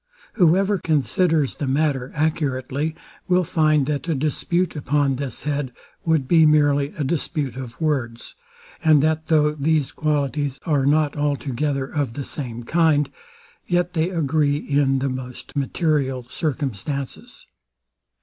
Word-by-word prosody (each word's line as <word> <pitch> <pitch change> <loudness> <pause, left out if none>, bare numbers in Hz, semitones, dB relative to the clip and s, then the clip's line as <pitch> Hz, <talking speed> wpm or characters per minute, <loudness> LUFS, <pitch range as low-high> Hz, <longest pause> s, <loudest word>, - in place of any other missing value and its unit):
Whoever 195 +1 +3
considers 160 -1 +1
the 145 - -4
matter 135 -2 0
accurately, 145 -1 -1 0.3
will 180 0 +3
find, 155 -3 +2
that 150 +3 -2
a 160 - +1
dispute 170 +6 -1
upon 145 -2 +1
this 135 -3 -5
head 145 -3 -2 0.3
would 160 -5 +2
be 165 +1 +5
merely 145 -2 +4
a 150 - -1
dispute 145 -3 -2
of 130 -3 -8
words, 130 -7 -2 0.5
and 155 -3 +5
that 160 0 0
though 150 -2 +3
these 150 -1 0
qualities 145 -2 -1
are 145 -5 +2
not 150 0 +2
altogether 140 -1 -1
of 140 -4 -2
the 140 +1 -5
same 120 -5 -5
kind, 155 +1 +2 0.6
yet 175 0 +1
they 165 0 +1
agree 150 -4 +1
in 140 -2 +1
the 135 +1 -1
most 130 +1 -7
material 140 -3 0
circumstances. 140 -2 -4
145 Hz, 130 wpm, -22 LUFS, 135-155 Hz, 0.6 s, be